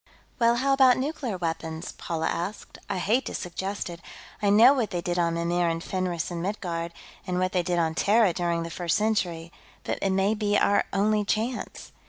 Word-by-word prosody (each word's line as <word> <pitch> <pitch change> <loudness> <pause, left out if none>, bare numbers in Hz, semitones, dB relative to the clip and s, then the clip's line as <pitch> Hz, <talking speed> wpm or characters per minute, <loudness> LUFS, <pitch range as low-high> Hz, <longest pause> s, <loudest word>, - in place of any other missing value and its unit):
"Well, 235 0 +4
how 275 +3 +2
about 260 -2 +6
nuclear 265 -6 -3
weapons?" 165 -1 -4
Paula 160 -1 -4
asked. 190 +5 -4
"I 200 - -1
hate 225 +8 +1
to - - -4
suggest 190 +3 -4
it 170 -1 -8 0.4
I 205 - +2
know 225 +6 +7
what 245 -6 0
they 175 - -2
did 175 +1 -2
on 170 -1 +1
Mimir, 170 +1 +1
and 165 +1 -3
Fenris, 180 -3 -2
and 170 -1 -4
Midgard, 170 -3 -3 0.4
and 180 -1 -1
what 185 0 +1
they 180 - +1
did 175 0 -1
on 165 -1 +1
Terra, 205 +2 +3
during 170 -1 -1
the 165 - -6
First 175 0 0
Century. 180 -6 -1 0.3
But - - -3
it 195 - +1
may 195 +2 +2
be 210 -1 +1
our 205 - +3
only 210 +1 +2
chance." 220 +5 -3
185 Hz, 200 wpm, -26 LUFS, 170-215 Hz, 0.4 s, know